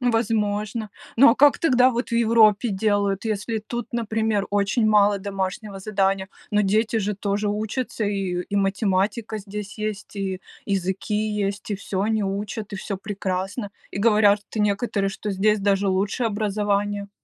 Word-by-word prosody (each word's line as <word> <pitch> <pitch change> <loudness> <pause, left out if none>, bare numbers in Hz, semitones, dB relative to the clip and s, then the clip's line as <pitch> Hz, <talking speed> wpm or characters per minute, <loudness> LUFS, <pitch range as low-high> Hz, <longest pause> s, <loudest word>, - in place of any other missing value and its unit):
Возможно. 220 -2 0 0.3
Ну 265 +2 +8
а - - +3
как 290 0 +5
тогда 255 -4 +4
вот 240 +1 -3
в - - -9
Европе 225 -1 +4
делают, 200 0 0
если 220 +1 -2
тут, 240 +2 -6
например, 220 -3 0
очень 205 +3 +1
мало 205 -1 +4
домашнего 195 +1 -4
задания, 195 -1 0 0.2
но 210 - +4
дети 215 +3 +1
же 205 0 -1
тоже 205 +1 -1
учатся, 215 +2 -2
и 195 -3 -1
и 200 - -2
математика 200 +2 0
здесь 200 0 -7
есть, 215 -1 -4
и 190 -2 -3 0.3
языки 195 +1 -1
есть, 210 -1 -2
и - - +1
всё 195 0 -3
они 220 0 +1
учат, 205 +2 -4
и - - -3
всё 195 +1 -4
прекрасно, 195 +2 -3 0.2
и - - -5
говорят, 210 -1 +4
что 215 - -3
некоторые, 200 -1 0
что 210 +2 -5
здесь 210 +2 +2
даже 200 0 +1
лучше 195 +5 0
образование. 205 -1 -1
205 Hz, 155 wpm, -23 LUFS, 195-220 Hz, 0.3 s, Ну